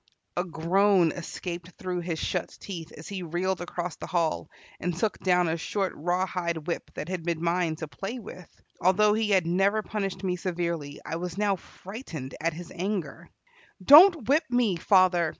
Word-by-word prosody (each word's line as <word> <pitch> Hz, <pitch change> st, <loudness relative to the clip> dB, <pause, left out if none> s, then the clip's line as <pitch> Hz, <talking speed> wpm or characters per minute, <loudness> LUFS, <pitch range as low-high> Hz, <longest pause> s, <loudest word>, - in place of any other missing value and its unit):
A 175 Hz, -, +1 dB
groan 180 Hz, +1 st, +3 dB
escaped 175 Hz, +1 st, -6 dB
through 180 Hz, -1 st, -3 dB
his 170 Hz, -2 st, -3 dB
shut -, -, -3 dB
teeth 170 Hz, -5 st, -7 dB
as 155 Hz, -, -9 dB
he 195 Hz, -2 st, -5 dB
reeled 175 Hz, +2 st, -1 dB
across 175 Hz, -1 st, -4 dB
the -, -, -7 dB
hall 170 Hz, -3 st, 0 dB, 0.3 s
and 175 Hz, -1 st, -2 dB
took 215 Hz, +3 st, -1 dB
down 180 Hz, -2 st, +3 dB
a 165 Hz, +1 st, 0 dB
short 190 Hz, +5 st, -2 dB
rawhide 175 Hz, -1 st, -1 dB
whip 170 Hz, -, -3 dB
that 150 Hz, -, -5 dB
had 185 Hz, -1 st, -3 dB
been 165 Hz, 0 st, -2 dB
mine 170 Hz, -1 st, +1 dB
to 160 Hz, 0 st, -6 dB
play 195 Hz, -, -5 dB
with. 180 Hz, -6 st, -10 dB, 0.3 s
Although 210 Hz, +4 st, +4 dB
he 220 Hz, 0 st, 0 dB
had 190 Hz, -4 st, +4 dB
never 195 Hz, +5 st, +2 dB
punished 195 Hz, -3 st, -3 dB
me 180 Hz, -1 st, 0 dB
severely, 170 Hz, -5 st, -3 dB
I 165 Hz, -, -3 dB
was 175 Hz, +1 st, -5 dB
now 205 Hz, -1 st, +2 dB
frightened 180 Hz, -, -8 dB
at 165 Hz, +1 st, 0 dB
his 175 Hz, +2 st, -9 dB
anger. 185 Hz, -5 st, -4 dB, 0.6 s
"Don't 315 Hz, -, +9 dB
whip 305 Hz, +4 st, +3 dB
me, 245 Hz, -6 st, +2 dB
father!" 180 Hz, -1 st, +4 dB
180 Hz, 175 wpm, -27 LUFS, 170-195 Hz, 0.6 s, Don't